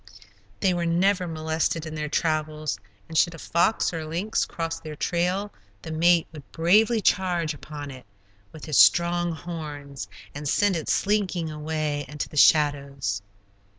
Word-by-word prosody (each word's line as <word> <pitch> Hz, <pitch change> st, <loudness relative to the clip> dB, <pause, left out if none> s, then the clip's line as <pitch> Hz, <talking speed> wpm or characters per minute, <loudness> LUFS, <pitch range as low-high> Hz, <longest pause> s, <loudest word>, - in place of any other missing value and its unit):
They 185 Hz, -, +3 dB
were 170 Hz, -1 st, -1 dB
never 180 Hz, +2 st, +2 dB
molested 160 Hz, 0 st, -1 dB
in 155 Hz, -, -6 dB
their 150 Hz, -1 st, -3 dB
travels, 155 Hz, -1 st, -1 dB, 0.3 s
and 160 Hz, -, -9 dB
should 170 Hz, +1 st, +3 dB
a -, -, -10 dB
fox 175 Hz, +5 st, +1 dB
or 165 Hz, -1 st, -3 dB
lynx 175 Hz, +8 st, -1 dB
cross 165 Hz, -1 st, -4 dB
their 155 Hz, -1 st, -8 dB
trail, 180 Hz, +6 st, -1 dB, 0.3 s
the 160 Hz, -, -6 dB
mate 170 Hz, +1 st, +4 dB
would 150 Hz, -4 st, -12 dB
bravely 215 Hz, +7 st, +3 dB
charge 175 Hz, -5 st, +1 dB
upon 145 Hz, -1 st, -8 dB
it 130 Hz, -5 st, -12 dB, 0.4 s
with 155 Hz, -, -10 dB
his 155 Hz, -4 st, +2 dB
strong 175 Hz, 0 st, +5 dB
horns, 150 Hz, -5 st, -7 dB, 0.3 s
and 145 Hz, 0 st, -4 dB
send 205 Hz, +3 st, +2 dB
it 160 Hz, -, -3 dB
slinking 190 Hz, -6 st, 0 dB
away 150 Hz, -1 st, -2 dB
into 145 Hz, +2 st, -4 dB
the -, -, -13 dB
shadows. 140 Hz, -8 st, +3 dB
160 Hz, 150 wpm, -25 LUFS, 150-175 Hz, 0.4 s, strong